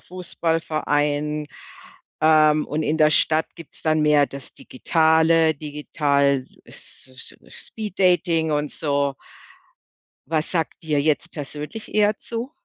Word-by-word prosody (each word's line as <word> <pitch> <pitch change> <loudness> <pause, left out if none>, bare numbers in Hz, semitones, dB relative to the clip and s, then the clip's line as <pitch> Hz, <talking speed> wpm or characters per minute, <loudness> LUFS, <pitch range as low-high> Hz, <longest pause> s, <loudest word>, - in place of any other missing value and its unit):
Fußballverein, 150 -4 -1 0.8
ähm, 155 -1 +4
und 155 +2 -2
in 155 - 0
der 155 0 +5
Stadt 155 +1 +3
gibt's 165 - -14
dann 155 -1 +2
mehr 150 -2 +4
das 140 -1 -11
Digitale, 160 +2 +2
Digital 140 -2 0 0.2
es - - -10
so 130 -1 -8
es - - -6
Speed 210 -4 -7
Dating 170 -4 +2
und 150 0 -1
so. 140 -2 -1 1.1
Was 155 0 -1
sagt 165 -1 -2
dir 150 -2 0
jetzt 155 +3 0
persönlich 150 +8 -6
eher 210 0 +3
zu? 235 +4 -6
155 Hz, 125 wpm, -22 LUFS, 145-165 Hz, 1.1 s, der